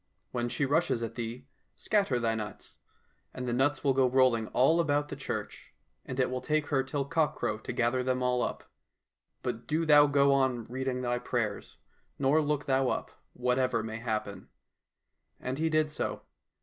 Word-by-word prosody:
When 120 Hz, -1 st, -1 dB
she 140 Hz, -, 0 dB
rushes 145 Hz, -4 st, +1 dB
at 115 Hz, 0 st, -4 dB
thee, 120 Hz, +2 st, -5 dB, 0.3 s
scatter 195 Hz, -, +1 dB
thy 115 Hz, -1 st, +1 dB
nuts, 110 Hz, -2 st, -7 dB, 0.6 s
and 125 Hz, -1 st, -4 dB
the 120 Hz, -, 0 dB
nuts 135 Hz, +3 st, +1 dB
will 140 Hz, -2 st, +3 dB
go 130 Hz, -1 st, +3 dB
rolling 125 Hz, -4 st, +3 dB
all 135 Hz, +10 st, +3 dB
about 145 Hz, -2 st, +1 dB
the -, -, -5 dB
church, 135 Hz, -, -6 dB, 0.3 s
and 130 Hz, 0 st, -5 dB
it 125 Hz, -1 st, +2 dB
will 130 Hz, 0 st, -2 dB
take 155 Hz, -1 st, 0 dB
her 140 Hz, -3 st, +2 dB
till 135 Hz, +1 st, -2 dB
cockcrow 140 Hz, -9 st, 0 dB
to -, -, -4 dB
gather 120 Hz, +2 st, +1 dB
them 130 Hz, 0 st, 0 dB
all 125 Hz, 0 st, +1 dB
up. -, -, -3 dB, 0.8 s
But 120 Hz, -2 st, -4 dB
do 160 Hz, +2 st, 0 dB
thou 145 Hz, -1 st, +7 dB
go 140 Hz, -1 st, +4 dB
on 130 Hz, -3 st, +1 dB
reading 130 Hz, +1 st, -3 dB
thy 120 Hz, 0 st, 0 dB
prayers, 120 Hz, -4 st, -3 dB, 0.4 s
nor 140 Hz, +3 st, +3 dB
look 150 Hz, -1 st, -1 dB
thou 135 Hz, -1 st, +2 dB
up, -, -, -3 dB, 0.2 s
whatever 125 Hz, -2 st, +1 dB
may 110 Hz, 0 st, -5 dB
happen." 110 Hz, -3 st, -4 dB, 0.9 s
And 130 Hz, +3 st, -4 dB
he 160 Hz, 0 st, +1 dB
did 155 Hz, -1 st, +1 dB
so. -, -, -3 dB
130 Hz, 175 wpm, -30 LUFS, 120-145 Hz, 0.9 s, thou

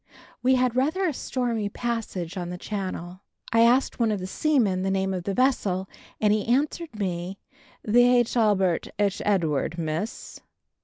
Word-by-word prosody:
We 260 Hz, +1 st, +4 dB
had 250 Hz, -1 st, +1 dB
rather 310 Hz, +9 st, +1 dB
a 320 Hz, -, -1 dB
stormy 235 Hz, -5 st, -2 dB
passage 205 Hz, -7 st, -4 dB
on 175 Hz, -2 st, -4 dB
the 180 Hz, -, -5 dB
Channel. 185 Hz, -2 st, -5 dB, 0.3 s
I 230 Hz, -, +4 dB
asked 245 Hz, +4 st, +3 dB
one 230 Hz, -2 st, +2 dB
of 205 Hz, -, -1 dB
the 185 Hz, -, -5 dB
seamen 210 Hz, -4 st, +1 dB
the 190 Hz, -, 0 dB
name 190 Hz, 0 st, 0 dB
of 180 Hz, -2 st, -4 dB
the 195 Hz, -, -2 dB
vessel 200 Hz, -8 st, +1 dB, 0.3 s
and 210 Hz, -1 st, +3 dB
he 210 Hz, -1 st, +1 dB
answered 285 Hz, +1 st, 0 dB
me 185 Hz, -1 st, -3 dB, 0.5 s
"The 245 Hz, +2 st, +5 dB
H'Albert 205 Hz, -7 st, +1 dB
H'Edward, 190 Hz, -7 st, 0 dB
Miss!" 165 Hz, +6 st, -4 dB
210 Hz, 155 wpm, -25 LUFS, 185-245 Hz, 0.5 s, The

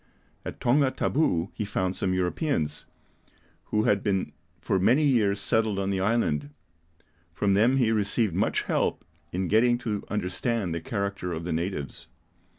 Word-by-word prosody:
At -, -, -7 dB
Tonga 135 Hz, +3 st, +3 dB
Tabou 100 Hz, -, 0 dB
he -, -, -3 dB
found 95 Hz, -3 st, -1 dB
some 95 Hz, -, -1 dB
Europeans, 90 Hz, -, -1 dB, 0.8 s
who 105 Hz, 0 st, 0 dB
had 100 Hz, -2 st, +2 dB
been 95 Hz, -2 st, -1 dB, 0.3 s
for 95 Hz, -, 0 dB
many 130 Hz, +11 st, +4 dB
years 105 Hz, -7 st, +2 dB
settled 110 Hz, 0 st, +1 dB
on 100 Hz, 0 st, -1 dB
the 95 Hz, -, 0 dB
island; 95 Hz, -9 st, 0 dB, 0.9 s
from 100 Hz, +1 st, +2 dB
them 115 Hz, +7 st, +4 dB
he 120 Hz, -4 st, +3 dB
received 105 Hz, -1 st, +1 dB
much -, -, +1 dB
help -, -, -1 dB, 0.3 s
in 90 Hz, +1 st, -1 dB
getting 120 Hz, +5 st, +4 dB
to 110 Hz, -4 st, -3 dB
understand 100 Hz, 0 st, -1 dB
the 85 Hz, -, -3 dB
character 100 Hz, -2 st, -3 dB
of 80 Hz, 0 st, -4 dB
the 85 Hz, -1 st, -2 dB
natives. 80 Hz, -4 st, -4 dB
100 Hz, 155 wpm, -27 LUFS, 90-115 Hz, 0.9 s, many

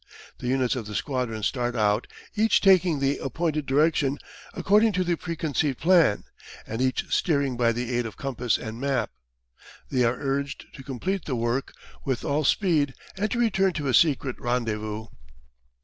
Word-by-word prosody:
The -, -, -5 dB
units 130 Hz, 0 st, +1 dB
of 115 Hz, -5 st, -5 dB
the 105 Hz, -, -6 dB
squadron 125 Hz, -5 st, -2 dB
start 120 Hz, +1 st, -1 dB
out, 105 Hz, 0 st, +1 dB, 0.3 s
each 220 Hz, 0 st, +3 dB
taking 185 Hz, -5 st, +4 dB
the 140 Hz, +1 st, 0 dB
appointed 150 Hz, +2 st, -2 dB
direction 145 Hz, 0 st, +2 dB, 0.4 s
according 210 Hz, +2 st, +3 dB
to 185 Hz, 0 st, +1 dB
the 175 Hz, -1 st, +1 dB
preconceived 155 Hz, -5 st, -2 dB
plan, 165 Hz, -, +4 dB, 0.4 s
and 115 Hz, +3 st, -4 dB
each 130 Hz, 0 st, 0 dB
steering 140 Hz, -5 st, +1 dB
by 120 Hz, -1 st, +2 dB
the 120 Hz, +1 st, -3 dB
aid 120 Hz, -1 st, 0 dB
of 110 Hz, -, -10 dB
compass 125 Hz, -4 st, -1 dB
and 110 Hz, +2 st, -7 dB
map. 135 Hz, -5 st, 0 dB, 0.8 s
They 125 Hz, -2 st, +2 dB
are 120 Hz, +1 st, +1 dB
urged 140 Hz, 0 st, -2 dB
to -, -, -10 dB
complete 145 Hz, +9 st, -3 dB
the 135 Hz, -, -2 dB
work 120 Hz, +3 st, -1 dB, 0.3 s
with 130 Hz, -3 st, -2 dB
all 150 Hz, +1 st, +1 dB
speed 150 Hz, -5 st, +2 dB, 0.2 s
and 205 Hz, +3 st, -1 dB
to 240 Hz, -, -2 dB
return 195 Hz, -5 st, +2 dB
to 145 Hz, -4 st, -2 dB
a -, -, +1 dB
secret 140 Hz, -2 st, +3 dB
rendezvous. 110 Hz, -3 st, -2 dB
135 Hz, 165 wpm, -26 LUFS, 120-165 Hz, 0.8 s, taking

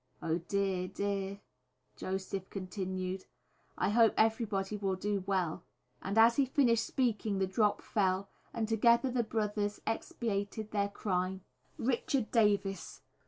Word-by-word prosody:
Oh! 165 Hz, +1 st, -1 dB
dear, 190 Hz, 0 st, -1 dB
dear," 200 Hz, 0 st, -3 dB, 0.5 s
Joseph 190 Hz, 0 st, -4 dB
continued: 185 Hz, -1 st, -4 dB, 0.5 s
"I -, -, +1 dB
hope 225 Hz, +1 st, +5 dB
everybody 215 Hz, -3 st, +1 dB
will 195 Hz, -2 st, -1 dB
do 200 Hz, 0 st, -1 dB
well," 185 Hz, -4 st, 0 dB, 0.4 s
and 200 Hz, +3 st, -3 dB
as 230 Hz, +1 st, +6 dB
he 280 Hz, -, +4 dB
finished 240 Hz, -4 st, +3 dB
speaking 220 Hz, -5 st, 0 dB
the 190 Hz, -, +2 dB
drop 205 Hz, +2 st, +1 dB
fell, 195 Hz, -2 st, +1 dB, 0.2 s
and 225 Hz, -2 st, -2 dB
together 235 Hz, +3 st, +4 dB
the 245 Hz, -1 st, +2 dB
brothers 210 Hz, -2 st, -1 dB
expiated 215 Hz, -1 st, -2 dB
their 200 Hz, -1 st, +1 dB
crime. 190 Hz, -2 st, -2 dB, 0.4 s
_Richard 250 Hz, 0 st, 0 dB
Davies. 205 Hz, -4 st, +1 dB
200 Hz, 125 wpm, -32 LUFS, 190-225 Hz, 0.5 s, as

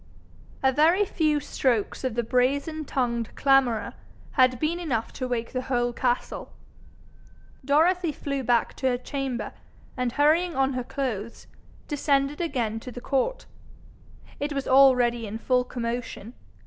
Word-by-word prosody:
A 265 Hz, -, +5 dB
very 330 Hz, +9 st, +4 dB
few 310 Hz, -5 st, +1 dB
strokes 245 Hz, -7 st, -1 dB
of 255 Hz, -4 st, -2 dB
the 240 Hz, -, 0 dB
brazen 280 Hz, +6 st, 0 dB
tongued 235 Hz, -4 st, -2 dB
clamourer 270 Hz, -5 st, +2 dB, 0.4 s
had 255 Hz, -2 st, +3 dB
been 325 Hz, +3 st, 0 dB
enough 255 Hz, -10 st, -2 dB
to 255 Hz, -, -4 dB
wake 235 Hz, -2 st, -3 dB
the 255 Hz, -, -1 dB
whole 245 Hz, -2 st, 0 dB
castle. 245 Hz, 0 st, -2 dB, 1.1 s
Dorothy 330 Hz, +5 st, +3 dB
flew 275 Hz, -1 st, -3 dB
back 240 Hz, -2 st, +1 dB
to 265 Hz, -, 0 dB
her 250 Hz, -1 st, +2 dB
chamber, 265 Hz, -1 st, -4 dB, 0.4 s
and 250 Hz, -2 st, -1 dB
hurrying 320 Hz, +4 st, +3 dB
on 270 Hz, 0 st, +2 dB
her 250 Hz, -1 st, -2 dB
clothes, 240 Hz, -5 st, -4 dB, 0.4 s
descended 285 Hz, 0 st, 0 dB
again 240 Hz, -9 st, -1 dB
to 250 Hz, -, -9 dB
the 245 Hz, -, -7 dB
court. 275 Hz, -, -1 dB, 0.9 s
It 290 Hz, +1 st, -2 dB
was 275 Hz, -1 st, -3 dB
already 250 Hz, -4 st, +5 dB
in 210 Hz, +2 st, -5 dB
full 250 Hz, +2 st, +1 dB
commotion. 235 Hz, -2 st, -5 dB
260 Hz, 140 wpm, -26 LUFS, 240-285 Hz, 1.1 s, A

